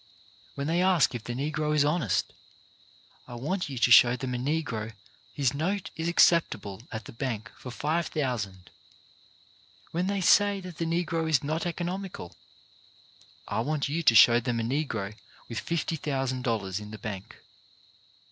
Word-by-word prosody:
When 140 - -3
they 165 +4 +1
ask 185 -6 +3
if 115 -2 -6
the 120 - -4
Negro 150 +2 -1
is 145 -1 +4
honest, 145 - 0 0.9
I 120 - -8
want 155 +9 -2
you 135 - -5
to 120 +1 +3
show 120 +1 +8
them 125 0 -4
a - - -1
Negro 125 -6 -2 0.4
whose 135 -3 +1
note 180 +7 -2
is 165 +1 -3
acceptable 165 - +3
at 110 -2 -6
the - - -9
bank 115 -3 -4
for 125 - -9
$5,000. 130 - -2 1.4
When 175 +3 -1
they 200 0 0
say 200 +2 +4
that 180 -4 -9
the 165 - 0
Negro 165 -1 -1
is 150 -3 +2
not 155 +4 -1
economical, 175 - -5 1.1
I - - -2
want 145 +4 -1
you 160 +4 -1
to 120 -8 +5
show 120 +2 +8
them 120 -1 -2
a - - -1
Negro 115 -6 -2 0.3
with 110 -4 -5
$50,000 130 - -2
in 105 0 -9
the 110 - -8
bank. 100 -2 -7
140 Hz, 155 wpm, -28 LUFS, 115-165 Hz, 1.4 s, show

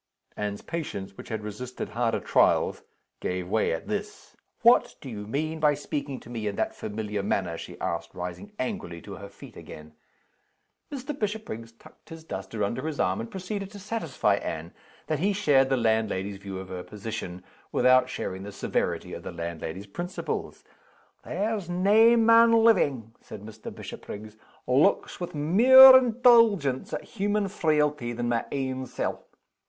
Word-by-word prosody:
Anne's 105 -1 -4
patience, 120 - -5
which - - -11
had 110 -2 -4
resisted 120 +5 -6
harder 115 -1 0
trials, - - +2 0.4
gave 90 -1 -3
way 110 +3 +1
at 80 - -4
this. - - -5 0.3
"What - - +5
do - - -10
you 105 -2 -7
mean 155 +7 -2
by 150 -1 +3
speaking 140 -1 -4
to - - -14
me 110 -3 -3
in 100 - -2
that - - -1
familiar 105 -1 -4
manner?" 95 -3 -1
she - - -9
asked, 85 0 -4
rising 90 - -6
angrily 90 - -4
to 100 -2 -8
her 100 0 -9
feet - - -14
again. 75 0 -11 1.0
Mr. 275 +1 -5
Bishopriggs 200 - -4
tucked 155 +8 -19
his 165 -1 -10
duster 100 -4 -5
under 125 +8 -2
his 155 -2 -4
arm, 95 +1 +1
and 115 - -5
proceeded 195 +1 -5
to 205 - -11
satisfy 165 - -1
Anne 80 -2 -5 0.3
that 155 -2 -1
he 200 +5 +1
shared 140 -10 +3
the 135 - +2
landlady's 110 -4 0
view 95 -1 -7
of 95 0 -8
her 90 -1 -5
position, 100 -3 -7 0.3
without 125 0 +4
sharing 95 -5 -4
the 100 +1 -7
severity - - -2
of - - -6
the - - -7
landlady's 85 +2 -6
principles. 175 - -5 0.6
"There's 205 -3 -2
nae 210 +6 +5
man 230 0 +6
livin'," 135 - +2
said 105 - -10
Mr. 110 0 -9
Bishopriggs, 105 +1 -9 0.3
"looks 130 +4 +2
with 175 -3 -5
mair 255 - +9
indulgence 230 - +4
at - - -4
human 205 -1 -1
frailty 150 - 0
than 120 0 -2
my 120 -1 0
ain 130 -1 -3
sel'. 125 - -4
125 Hz, 160 wpm, -27 LUFS, -, 1.0 s, mair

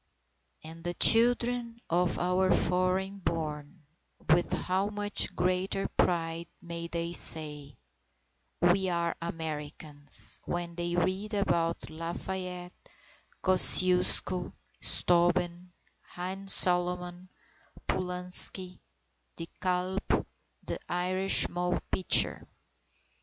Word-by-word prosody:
And 165 +1 -12
the 175 0 -5
children 235 0 +4
of 175 +1 -2
our 180 +1 -1
foreign 185 +2 -2
born, 155 -2 -7 0.5
with 175 +2 +1
how 190 +2 -3
much 205 0 -1
greater 185 +2 -3
pride 165 -1 -3
may 170 -2 -9
they 170 0 -6
say, 150 -4 +2 0.8
"We 185 +2 +1
are 170 -1 -3
Americans!" 150 -3 +3
when 175 -1 -6
they 175 0 -5
read 190 +5 -3
about 170 -5 -3
Lafayette, 180 +2 -8 0.7
Kosciuszko, 185 -1 +5 0.3
Steuben, 175 0 -1 0.4
Haym 190 +2 -8
Salomon, 180 0 +1 0.6
Pulaski, 180 0 -1 0.6
De 165 - -8
Kalb, 185 +1 -3 0.7
and - - -6
Irish 185 +2 0
Moll 180 0 -4
Pitcher. 185 - +2
180 Hz, 90 wpm, -27 LUFS, 170-185 Hz, 0.8 s, Kosciuszko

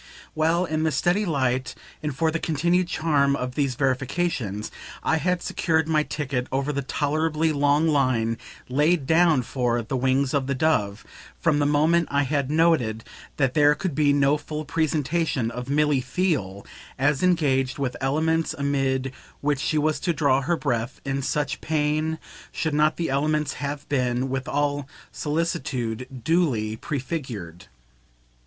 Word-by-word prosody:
Well 165 +3 +2
in 155 -2 -1
the 160 0 +1
steady 175 +9 +1
light 130 -4 0 0.3
and 150 -3 -3
for 160 0 +2
the 165 - -2
continued 170 +4 +1
charm 145 -5 +2
of 125 -1 -4
these 135 -2 0
verifications 130 - -1 0.3
I 160 - +2
had 180 +2 0
secured 160 -2 0
my 155 -1 +3
ticket 135 -4 -3
over 135 +2 -1
the 140 - -1
tolerably 155 +3 0
long 145 +2 +3
line 130 -6 +1 0.3
laid 150 +3 +2
down 160 -3 +4
for 120 -1 0
"The 110 - -4
Wings 130 +1 +1
of 140 -2 0
the 140 - 0
Dove" 115 -9 0 0.3
from 155 -4 +2
the 145 - +2
moment 155 +3 +3
I 140 0 +2
had 140 -1 -1
noted 150 -9 +2 0.3
that 135 -3 +1
there 150 -1 +5
could 185 0 -3
be 145 0 +3
no 140 +1 +3
full 150 +1 -6
presentation 155 -5 0
of 125 +2 -6
Milly 145 -1 +2
Theale 130 - -1 0.3
as 140 +1 +1
ENGAGED 140 -8 +2
with 135 -3 -2
elements 160 +4 +1
amid 135 -2 0 0.3
which 145 -1 0
she 155 - 0
was 155 +1 +1
to 175 - 0
draw 140 -2 +2
her 170 +5 0
breath 120 -6 -2
in 135 0 -1
such 145 +2 -2
pain, 155 +1 0 0.3
should 160 -2 -2
not 150 +1 +2
the 165 -4 -1
elements 150 +2 0
have 145 +1 -4
been, 125 -2 0
with 135 0 -3
all 145 -1 -1 0.2
solicitude, 130 -6 -3
duly 125 -10 +1
prefigured. 125 - -5
145 Hz, 155 wpm, -24 LUFS, 130-160 Hz, 0.3 s, there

